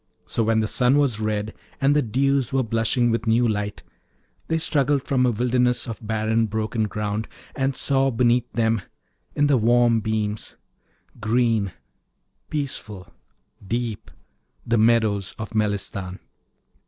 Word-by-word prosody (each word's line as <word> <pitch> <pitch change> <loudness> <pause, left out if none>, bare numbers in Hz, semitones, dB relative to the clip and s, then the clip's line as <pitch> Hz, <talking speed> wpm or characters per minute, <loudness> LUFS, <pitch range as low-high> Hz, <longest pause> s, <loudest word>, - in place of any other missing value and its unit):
So - - -2
when 110 0 +2
the 110 - 0
sun 125 +5 +3
was 135 -7 +1
red 110 0 -2 0.3
and 140 +1 +3
the 150 - +4
dews 135 +1 +1
were 135 -1 +1
blushing 115 +2 +1
with 115 0 -2
new 115 +2 +3
light, 105 -1 -3 0.6
they 160 - +1
struggled 145 -3 +1
from 130 -2 +2
a - - +3
wilderness 125 +2 +1
of 115 -3 -5
barren 110 +1 0
broken 110 +1 -1
ground, 105 +1 -3 0.3
and 135 -1 -1
saw 135 -1 +2
beneath 120 0 +1
them, 110 -1 +1 0.5
in 145 - +3
the 145 -2 +4
warm 120 0 +4
beams, 110 -1 -3 0.6
green, 110 -3 +1 0.8
peaceful, 110 - -4 0.5
deep, 115 - -3 0.6
the 115 -1 +2
meadows 110 -3 +2
of 110 -1 -7
Melistan. 100 -3 -2
115 Hz, 135 wpm, -23 LUFS, 110-125 Hz, 0.8 s, the